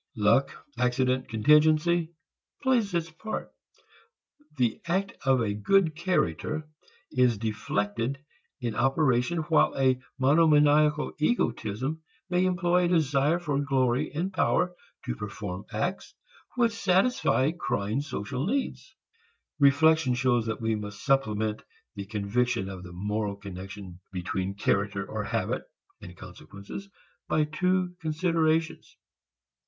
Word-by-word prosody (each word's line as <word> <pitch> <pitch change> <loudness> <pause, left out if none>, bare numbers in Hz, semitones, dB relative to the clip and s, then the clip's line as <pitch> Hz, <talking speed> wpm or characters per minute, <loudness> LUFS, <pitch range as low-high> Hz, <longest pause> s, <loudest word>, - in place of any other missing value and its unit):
Luck, 110 +5 +2
accident, 125 +1 +1
contingency, 155 +8 +3 0.5
plays 245 -6 +2
its 165 -1 -1
part. 220 +7 -6 1.0
The 120 -4 0
act 190 +3 0
of 130 -2 +4
a 105 -2 -1
good 160 - +2
character 155 - -1 0.4
is 125 -3 +3
deflected 110 +3 -2 0.4
in 120 -4 -3
operation, 135 +5 +1
while 160 - +3
a 130 -1 +2 0.2
monomaniacal 150 +1 +4
egotism 150 - -1 0.3
may 180 +1 +3
employ 180 0 +2
a - - +2
desire 150 -2 +2
for 150 -5 -2
glory 130 -3 +1
and 175 +6 -3
power 180 0 +1 0.3
to - - -3
perform 100 - -6
acts 175 - -3 0.4
which 235 -2 +3
satisfy 190 - +2
crying 110 - -2
social 130 - -4
needs. 270 +5 -3 0.6
Reflection 145 -1 +4
shows 120 -2 +1
that 110 - -3
we 110 0 0
must 105 -1 -6
supplement 110 -6 +1 0.3
the 100 -3 -7
conviction 105 0 -1
of 95 -2 -7
the 90 -1 -10
moral 105 +3 -2
connection 95 -1 -9
between 95 +1 -3
character 100 -1 0
or 110 -1 -4
habit 115 +1 -1 0.4
and 90 -1 -11
consequences 100 - -10 0.4
by 155 - +2
two 180 +4 0
considerations. 160 0 0
135 Hz, 115 wpm, -27 LUFS, 105-165 Hz, 1.0 s, of